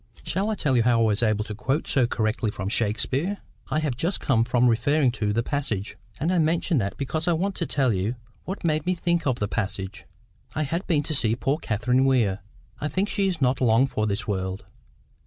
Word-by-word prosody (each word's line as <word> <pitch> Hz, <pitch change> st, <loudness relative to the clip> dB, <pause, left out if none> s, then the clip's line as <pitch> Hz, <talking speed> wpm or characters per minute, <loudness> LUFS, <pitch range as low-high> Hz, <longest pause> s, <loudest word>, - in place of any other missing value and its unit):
"Shall 195 Hz, +4 st, -1 dB
I 220 Hz, -, 0 dB
tell 145 Hz, -9 st, +1 dB
you 120 Hz, -, +4 dB
how 120 Hz, 0 st, +3 dB
I -, -, +4 dB
was 110 Hz, -1 st, +2 dB
able 110 Hz, -2 st, +2 dB
to 105 Hz, -, -6 dB
quote 130 Hz, +8 st, -1 dB
so 130 Hz, -4 st, +3 dB
correctly 110 Hz, -1 st, 0 dB
from 95 Hz, -1 st, -4 dB
Shakespeare? 130 Hz, -, 0 dB, 0.3 s
I -, -, 0 dB
have 145 Hz, -5 st, -1 dB
just 170 Hz, +10 st, -1 dB
come 115 Hz, -4 st, +2 dB
from 125 Hz, +1 st, +2 dB
referring 125 Hz, +4 st, +3 dB
to 105 Hz, -4 st, -1 dB
the 115 Hz, +3 st, 0 dB
passage. 120 Hz, -9 st, -2 dB, 0.2 s
And 165 Hz, +6 st, +1 dB
I 180 Hz, -, +3 dB
mention 165 Hz, 0 st, +2 dB
that 100 Hz, -1 st, -3 dB
because 155 Hz, +4 st, -2 dB
I 175 Hz, -, +4 dB
want 190 Hz, +5 st, 0 dB
to 170 Hz, -, -1 dB
tell 130 Hz, -5 st, +1 dB
you 100 Hz, +6 st, -1 dB, 0.3 s
what 190 Hz, +2 st, -5 dB
made 155 Hz, -1 st, 0 dB
me 185 Hz, -, +2 dB
think 170 Hz, -2 st, 0 dB
of 130 Hz, -3 st, +1 dB
the 105 Hz, -, -1 dB
passage. 95 Hz, -2 st, -4 dB, 0.5 s
I 155 Hz, -, +1 dB
had 165 Hz, +6 st, -3 dB
been 150 Hz, -5 st, +2 dB
to 155 Hz, -, -2 dB
see 115 Hz, -5 st, +2 dB
poor 135 Hz, +5 st, 0 dB
Catherine 125 Hz, +1 st, +1 dB
Weir. 115 Hz, -8 st, +2 dB, 0.4 s
I 150 Hz, -, -1 dB
think 190 Hz, +6 st, -1 dB
she 200 Hz, -2 st, +1 dB
is 175 Hz, -5 st, -2 dB
not 130 Hz, +1 st, +2 dB
long 120 Hz, +1 st, +4 dB
for 110 Hz, -5 st, -1 dB
this 105 Hz, +5 st, -2 dB
world. 95 Hz, -1 st, -3 dB
130 Hz, 225 wpm, -25 LUFS, 110-155 Hz, 0.5 s, you